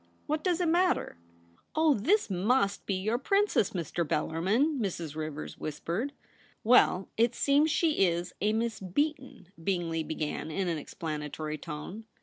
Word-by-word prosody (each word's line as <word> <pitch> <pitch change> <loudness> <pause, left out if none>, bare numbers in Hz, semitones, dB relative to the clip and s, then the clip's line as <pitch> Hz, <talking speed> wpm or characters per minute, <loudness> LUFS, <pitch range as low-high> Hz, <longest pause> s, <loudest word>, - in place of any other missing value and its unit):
* - - -36
What 305 +1 -1
does 360 -2 +1
it 355 - +1
matter 350 - +1 0.2
?' 85 0 -31
' - - -44
Oh, 315 -1 +5
this 340 - +2
mus^ 200 +2 +1
be 195 - +1
your 215 +6 0
Princess, 395 - +2
Mr. 170 -1 -2
Bel 150 - 0
larmin,' 225 - +1
Mrs. 170 -8 -3
Rivers 155 -1 -5
whispered. 170 - -3 0.5
'Well, 215 -5 +4
it 235 +1 +3
seems 290 +3 +3
she 310 - +2
is 175 +1 -2
a 210 +2 +3
Miss 225 0 -1
Beaton,' 260 - -2
Bingley 170 -3 0
began, 155 0 -3
in 185 +4 -1
an 165 -3 -1
explanatory 155 0 -5
tone. 165 +9 -7
195 Hz, 160 wpm, -30 LUFS, -, 0.5 s, Oh